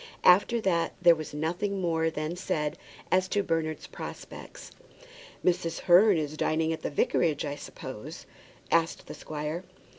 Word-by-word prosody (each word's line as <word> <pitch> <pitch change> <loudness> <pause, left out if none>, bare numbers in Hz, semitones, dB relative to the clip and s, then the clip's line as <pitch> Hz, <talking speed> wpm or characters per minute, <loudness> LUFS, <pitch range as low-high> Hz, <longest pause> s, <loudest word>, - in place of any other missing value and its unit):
After 205 +6 +5
that 170 -4 +1
there 175 -1 +7
was 155 -2 -6
nothing 175 +7 -2
more 165 -2 +1
then 155 +1 -4
said 150 -4 -2 0.4
as 185 0 +3
to 205 +1 0
Bernard's 160 -3 -2
prospects. - - -9 0.7
"Mrs. 175 -2 0
Hearn 190 +2 +6
is 155 -1 -3
dining 160 +1 +1
at 160 - -6
the - - -2
vicarage, 150 +1 +1
I 145 0 -3
suppose?" - - -9 0.5
asked 165 0 +1
the - - -8
squire. 155 +3 -5
165 Hz, 145 wpm, -28 LUFS, 155-180 Hz, 0.7 s, there